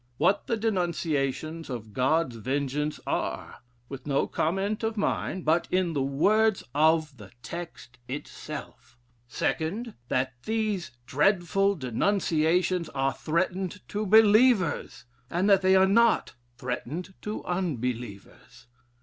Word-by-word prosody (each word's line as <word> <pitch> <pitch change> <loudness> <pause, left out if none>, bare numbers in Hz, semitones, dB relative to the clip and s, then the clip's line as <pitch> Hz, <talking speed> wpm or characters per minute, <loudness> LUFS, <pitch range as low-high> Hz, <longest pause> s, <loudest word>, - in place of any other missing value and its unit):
What 195 +6 +2
the 230 - 0
denunciations 165 - -1
of 110 -4 -6
God's 130 +1 +1
vengeance 140 +5 -2
are: - - -3 0.3
with 135 +1 -9
no 140 -1 +2
comment 195 +6 -1
of 225 0 -2
mine, 190 -2 -1
but 160 +3 +2
in 180 -2 +1
the 140 - 0
words 200 +11 +2
of 155 -1 +2
the 100 -3 -12
text 165 -7 -8
itself. 140 -2 -8 0.3
2d. 205 - -2
That 130 +1 0
these 215 -5 -1 0.2
dreadful 195 +7 +2
denunciations 170 - +1
are 135 0 +1
threatened 185 +7 -2
to 210 0 -2
believers: 215 - +4 0.2
and 180 +4 0
that 195 -1 +6
they 190 0 +4
are 190 0 +6
not 230 +4 +3 0.2
threatened 140 +9 -5
to 210 +1 -5
unbelievers. 125 - -4
165 Hz, 115 wpm, -27 LUFS, 135-195 Hz, 0.3 s, that